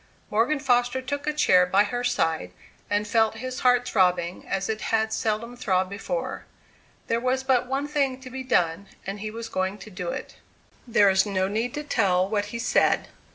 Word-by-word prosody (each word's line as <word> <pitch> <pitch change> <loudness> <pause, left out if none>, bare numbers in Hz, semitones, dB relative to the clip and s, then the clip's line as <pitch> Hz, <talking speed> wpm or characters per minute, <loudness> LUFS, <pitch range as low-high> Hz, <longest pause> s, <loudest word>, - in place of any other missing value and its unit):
Morgan 230 +8 +2
Foster 245 -2 +2
took 285 +3 -4
a - - +3
chair 185 -11 +4
by 195 +3 +4
her 245 +4 -3
side, 160 - 0 0.4
and 205 +1 0
felt 220 0 +2
his 255 +2 -5
heart 245 -1 +3
throbbing 180 -4 +1
as 195 0 -1
it 220 -1 -3
had 220 0 0
seldom 225 +3 -2
throbbed 190 -6 0
before. 225 - -4 0.6
There 230 - 0
was 255 +2 0
but 255 -2 +2
one 270 +2 -1
thing 275 -3 0
to 255 -1 -10
be 260 +1 -5
done, 195 -7 +1 0.2
and 195 +1 -5
he 215 +1 -4
was 225 +1 -6
going 190 +2 -2
to 210 +1 -11
do 180 -2 -4
it. - - -6 0.5
There 205 -4 +5
is 190 +2 +3
no 190 -2 0
need 225 +4 -2
to 295 - -3
tell 190 -10 +2
what 205 0 0
he 210 +3 -6
said. 230 - +2
220 Hz, 195 wpm, -25 LUFS, 195-255 Hz, 0.6 s, There